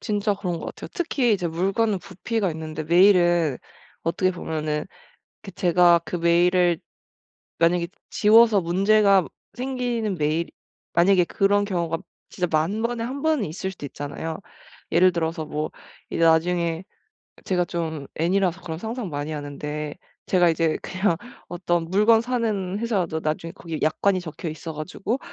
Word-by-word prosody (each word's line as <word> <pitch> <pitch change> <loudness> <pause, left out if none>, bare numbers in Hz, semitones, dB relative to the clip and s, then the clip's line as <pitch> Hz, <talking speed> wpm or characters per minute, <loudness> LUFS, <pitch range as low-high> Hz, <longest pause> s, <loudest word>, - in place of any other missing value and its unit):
진짜 205 -2 0
그런거 180 -4 -4
같아요. - - -8
특히 280 - +1
이제 180 -4 0
물건은 195 +5 0
부피가 200 +2 -2
있는데 155 -1 -5
메일은 175 -4 +4 0.4
어떻게 185 +3 +1
보면은 155 -3 -3 0.6
그 200 - -8
제가 175 -2 +4
그 - - -4
메일을 175 0 +3 0.8
만약에 170 +1 +2 0.2
지워서 220 -1 +5
문제가 195 +2 +4 0.3
생기는 245 -5 -2
메일 155 +2 0 0.4
만약에 180 +1 +5
그런 200 +3 +2
경우가 170 -4 -1 0.3
진짜 180 -2 -1
10,000 165 +8 0
번에 235 -1 -1
1 270 +4 -5
번은 310 -8 +2
있을 185 +4 -4
수도 150 -6 -8
있잖아요. 145 +3 -5 0.5
예를 180 +1 +5
들어서 165 -1 -2
뭐 150 +1 -3 0.4
이제 - - -1
나중에 165 +1 +2 0.6
제가 180 -2 +1
좀 160 -4 -4
N이라서 180 +2 +1
그런 160 -1 -5
상상 225 +1 -4
많이 145 0 -4
하는데 150 +1 -5 0.3
제가 180 -2 +4
이제 160 -1 +1
그냥 185 -1 0 0.3
어떤 175 -1 -1
물건 210 +4 +5
사는 220 -6 -1
회사라도 190 -9 -1
나중에 155 +2 -3
거기 165 -3 -6
약관이 185 +4 +2
적혀 165 0 -6
있어 160 +1 -6
가지고 190 - -3
180 Hz, 310 characters per minute, -24 LUFS, 165-205 Hz, 0.8 s, 지워서